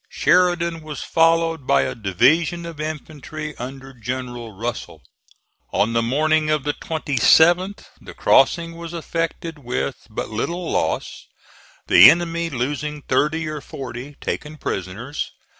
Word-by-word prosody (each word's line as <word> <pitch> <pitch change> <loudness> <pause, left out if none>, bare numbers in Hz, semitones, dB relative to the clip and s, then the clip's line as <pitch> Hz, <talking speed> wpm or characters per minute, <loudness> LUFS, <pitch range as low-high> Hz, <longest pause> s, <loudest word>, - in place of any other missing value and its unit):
Sheridan 170 -2 +2
was 155 -1 -7
followed 165 -3 +2
by 70 -1 +4
a - - -2
division 155 - +2
of 165 -3 -7
infantry 155 0 -6
under 135 +2 -8
General 120 -1 -5
Russell. 115 +4 -6 0.7
On 110 +3 +1
the 115 - +2
morning 155 +6 +1
of 150 -2 +1
the 145 - -1
27th 165 - +3 0.2
the - - -11
crossing 165 -1 +3
was 170 0 -7
effected 165 -1 -3
with 125 0 -4
but 105 - -4
little 170 +10 -3
loss, - - -2 0.6
the - - +9
enemy 170 0 +1
losing 145 +2 -3
thirty 155 +4 0
or 155 -1 -5
forty, 135 0 -8
taken 150 +1 -4
prisoners. 105 - -4
150 Hz, 125 wpm, -21 LUFS, 125-165 Hz, 0.7 s, the